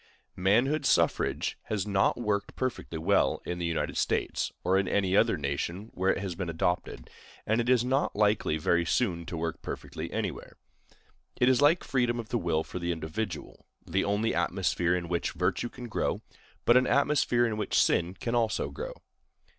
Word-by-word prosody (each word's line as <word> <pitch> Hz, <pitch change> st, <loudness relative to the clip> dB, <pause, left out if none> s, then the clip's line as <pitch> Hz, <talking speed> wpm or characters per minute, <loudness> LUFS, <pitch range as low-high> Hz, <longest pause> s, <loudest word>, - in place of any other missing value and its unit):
Manhood 120 Hz, +11 st, +2 dB
suffrage -, -, +1 dB
has 105 Hz, -4 st, -2 dB
not 100 Hz, -2 st, +2 dB
worked 100 Hz, -3 st, -1 dB
perfectly 130 Hz, -9 st, -3 dB
well 80 Hz, -, +2 dB
in 90 Hz, 0 st, -3 dB
the 85 Hz, -, -1 dB
United 85 Hz, -, -2 dB
States, -, -, 0 dB
or 95 Hz, -, +2 dB
in 95 Hz, -1 st, +2 dB
any 95 Hz, -1 st, +1 dB
other 115 Hz, -2 st, +4 dB
nation 85 Hz, +8 st, -3 dB
where 95 Hz, +1 st, +2 dB
it -, -, -1 dB
has 95 Hz, -3 st, -3 dB
been 85 Hz, 0 st, -4 dB
adopted, 85 Hz, +2 st, -2 dB, 0.4 s
and 110 Hz, +2 st, +2 dB
it 120 Hz, -, -2 dB
is 125 Hz, -2 st, +4 dB
not 135 Hz, +3 st, 0 dB
likely 105 Hz, -6 st, +2 dB
very 85 Hz, +2 st, +2 dB
soon 85 Hz, -3 st, 0 dB
to 85 Hz, -, -4 dB
work 80 Hz, 0 st, -3 dB
perfectly -, -, -6 dB
anywhere. -, -, -4 dB, 0.8 s
It 125 Hz, -, +5 dB
is 130 Hz, +1 st, +3 dB
like 155 Hz, +5 st, +4 dB
freedom 120 Hz, -2 st, 0 dB
of 110 Hz, -2 st, -6 dB
the 120 Hz, -, 0 dB
will 80 Hz, -4 st, 0 dB
for 90 Hz, -, -6 dB
the 85 Hz, 0 st, -1 dB
individual—the 85 Hz, +2 st, -4 dB
only 105 Hz, +3 st, 0 dB
atmosphere 90 Hz, 0 st, +1 dB
in 90 Hz, -1 st, -3 dB
which 85 Hz, 0 st, -1 dB
virtue 120 Hz, -, -1 dB
can 125 Hz, 0 st, -9 dB
grow, 110 Hz, -, -2 dB, 0.4 s
but 120 Hz, -, +6 dB
an 130 Hz, -, +3 dB
atmosphere 130 Hz, -2 st, +3 dB
in 110 Hz, -2 st, -1 dB
which 105 Hz, -, -1 dB
sin 90 Hz, +2 st, +2 dB
can 115 Hz, -, -4 dB
also 115 Hz, -2 st, 0 dB
grow. -, -, -6 dB
100 Hz, 180 wpm, -29 LUFS, 85-120 Hz, 0.8 s, but